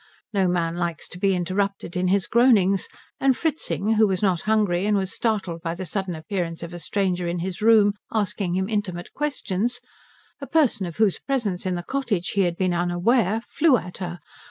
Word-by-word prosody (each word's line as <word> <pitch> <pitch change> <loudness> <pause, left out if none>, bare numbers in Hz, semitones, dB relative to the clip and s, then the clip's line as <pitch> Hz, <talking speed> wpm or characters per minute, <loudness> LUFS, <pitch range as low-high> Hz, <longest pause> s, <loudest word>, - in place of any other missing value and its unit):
No 195 -2 +2
man 170 -1 0
likes 170 -2 -3
to 180 - -8
be 195 -1 +2
interrupted 190 0 -2
in 180 0 +1
his 195 +1 +2
groanings; 215 -6 +4 0.3
and 265 -2 +3
Fritzing, 290 - 0
who 220 0 +5
was 190 0 -1
not 180 -5 +2
hungry 205 -4 +2
and 210 -1 +3
was 190 -1 -2
startled 195 -7 -1
by 165 0 -3
the 185 +1 -5
sudden 190 0 -2
appearance 165 +1 -4
of 170 +1 -7
a 175 - -6
stranger 180 0 -1
in 170 +1 -2
his 180 +2 -4
room 215 -2 +5 0.2
asking 205 -4 -1
him 190 0 0
intimate 200 -5 -3
questions, 245 -6 -2 0.6
a 275 - -6
person 250 - +2
of 170 - -8
whose 215 -4 +2
presence 210 -10 -2
in 185 - 0
the 175 - -4
cottage 230 -8 -1
he 200 - +1
had 175 -2 0
been 185 -2 +1
unaware, 190 +6 +1
flew 310 -6 +4
at 180 -4 -8
her. 175 -2 -4
190 Hz, 195 wpm, -24 LUFS, 175-215 Hz, 0.6 s, who